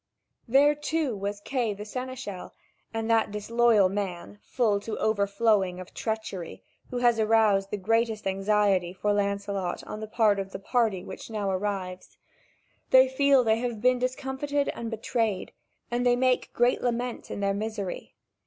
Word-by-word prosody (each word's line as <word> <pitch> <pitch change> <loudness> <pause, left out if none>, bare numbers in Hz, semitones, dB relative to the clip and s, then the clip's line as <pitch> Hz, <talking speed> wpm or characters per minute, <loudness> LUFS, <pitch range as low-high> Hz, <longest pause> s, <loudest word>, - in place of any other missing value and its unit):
There, 280 +5 +5
too, 295 -3 -1
was 200 +1 -4
Kay 235 -4 -1
the 205 +1 -8
seneschal, 250 -4 -6 0.4
and 225 0 -3
that 225 -1 +3
disloyal 215 0 +3
man, 180 - -4
full 210 - +1
to 215 +2 -5
overflowing 200 -3 +1
of 185 - -10
treachery, 220 -6 -4 0.3
who 250 - -4
has 240 -2 +3
aroused 215 -3 +3
the 210 - -3
greatest 225 +2 0
anxiety 195 -2 +1
for 205 +2 0
Lancelot 200 -2 -2
on 215 - -7
the 215 - -6
part 215 -2 +2
of 195 0 -5
the - - -3
party 215 -3 0
which - - -9
now 210 -3 -2
arrives. 185 -1 -4 0.7
They 260 0 +7
feel 275 0 +4
they 220 -1 +2
have 240 -2 -3
been 250 +2 +3
discomfited 265 +3 -1
and 230 -1 -4
betrayed, 225 -3 -2 0.4
and 240 +1 0
they 245 -1 +4
make 255 0 +1
great 240 +1 +2
lament 245 0 -2
in - - -5
their 200 0 +1
misery. 205 -2 -5
215 Hz, 155 wpm, -27 LUFS, 200-245 Hz, 0.7 s, They